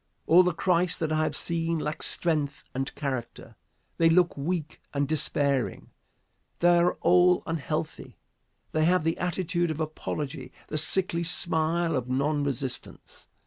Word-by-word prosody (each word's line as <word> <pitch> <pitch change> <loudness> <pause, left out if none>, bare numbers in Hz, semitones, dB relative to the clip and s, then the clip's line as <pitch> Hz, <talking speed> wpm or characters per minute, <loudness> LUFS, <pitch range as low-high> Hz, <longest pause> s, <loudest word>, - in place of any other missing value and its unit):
All 175 +3 +7
the 180 0 +2
Christs 175 0 +1
that 160 -1 -2
I 155 0 +1
have 155 - -1
seen 165 -1 -1
lack 150 0 -4
strength 150 -4 +1
and 135 +1 -4
character. 130 -5 -5 0.4
They 165 -1 +5
look 175 +1 +3
weak 155 +2 -4
and 140 0 +1
despairing. 140 -3 0 0.7
They 175 0 +4
are 175 +1 +3
all 180 +1 +4
unhealthy. 160 -1 -4 0.5
They 155 0 +1
have 180 0 +3
the 165 +1 -1
attitude 175 -1 -1
of 155 -1 -4
apology, 150 -4 -4 0.2
the 155 - -1
sickly 170 +1 +2
smile 165 -1 +1
of 125 -1 -3
non 145 +3 0
resistance. 135 -2 -5
160 Hz, 145 wpm, -27 LUFS, 145-175 Hz, 0.7 s, All